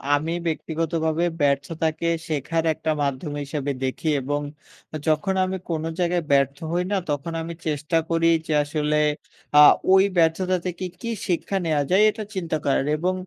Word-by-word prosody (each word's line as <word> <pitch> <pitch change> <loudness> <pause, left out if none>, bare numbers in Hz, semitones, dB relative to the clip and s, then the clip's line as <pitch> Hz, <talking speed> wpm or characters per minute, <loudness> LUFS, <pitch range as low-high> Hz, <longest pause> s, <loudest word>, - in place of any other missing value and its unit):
আমি 160 +3 -2
ব্যক্তিগতভাবে 160 0 -1 0.2
ব্যর্থতাকে 155 +3 0 0.2
শেখার 160 +2 -1
একটা 155 - -2
মাধ্যম 140 +2 -2
হিসাবে 140 0 -3
দেখি। 130 +4 -2
এবং 145 +3 -2 0.7
যখন 155 +5 +2
আমি 190 0 -3
কোনো 160 -1 -2
জায়গায় 175 0 +1
ব্যর্থ 140 0 +3
হই 175 +1 +1
না, 200 - +2
তখন 145 +3 -3
আমি 170 +1 -5
চেষ্টা 150 +2 0
করি 165 0 +3 0.2
যে, 155 - 0
আসলে 150 +1 0 0.6
আ - - +10 0.3
ওই 190 0 +7
ব্যর্থতা 180 +3 +2
থেকে 180 +1 -3 0.2
কি 230 - -4 0.2
শিক্ষা 185 +2 -1
নেওয়া 150 -3 +1
যায়, 195 +3 +5
এটা 215 0 -4
চিন্তা 170 -4 -1
করার। 135 -1 +2
এবং 180 +4 0
160 Hz, 155 wpm, -23 LUFS, 145-170 Hz, 0.7 s, আ